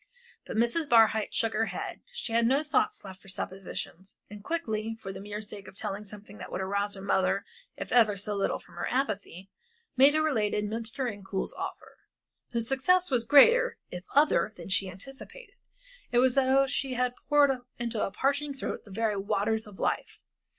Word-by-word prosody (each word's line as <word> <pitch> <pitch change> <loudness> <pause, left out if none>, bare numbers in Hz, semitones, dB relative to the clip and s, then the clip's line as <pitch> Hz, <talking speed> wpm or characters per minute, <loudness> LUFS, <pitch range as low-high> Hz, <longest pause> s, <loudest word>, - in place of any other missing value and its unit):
But - - -4
Mrs. 240 +7 +1
Barhyte 220 -2 +5
shook 225 -1 0
her 225 +1 +1
head, - - -5
she 480 - -5
had 230 0 +4
no 275 +5 +3
thoughts 425 - 0
left 190 -1 -10
for - - -18
suppositions. 190 0 -6
And 205 -1 -10
quickly, 225 -8 -2
for 195 -3 -6
the - - -8
mere 205 +1 -5
sake 205 -2 -9
of 190 - -12
telling 200 +1 -4
something 205 0 -11
that - - -8
would - - -3
arouse 200 +2 -1
her 195 - -8
mother 195 0 +1 0.3
if - - -6
ever 220 -4 +4
so 205 +2 -3
little 200 -1 0
from - - -19
her - - -2
apathy, 200 -7 -2 0.4
Maida 280 +4 +6
related 210 -8 +1
Mr. 230 +5 -2
Incoul's 200 -3 -3
offer. - - -7 0.5
Her 235 - 0
success 280 +9 +2
was 240 -3 +2
greater, 470 - +6
if 180 0 -6
other, 290 -6 +4
than - - -9
she 190 0 +2
anticipated. 270 - -8 0.6
It 240 - +2
was 250 0 +4
as 270 -1 +4
though 270 +1 +5
she 265 -1 -2
had 250 0 +1 0.2
poured 290 -1 +6 0.3
into 235 -2 -2
a - - 0
parching 280 +6 -1
throat 270 - -4
the - - -14
very 215 0 0
waters 215 +2 0
of 205 -2 -13
life. - - -1
225 Hz, 185 wpm, -29 LUFS, 200-270 Hz, 0.6 s, Maida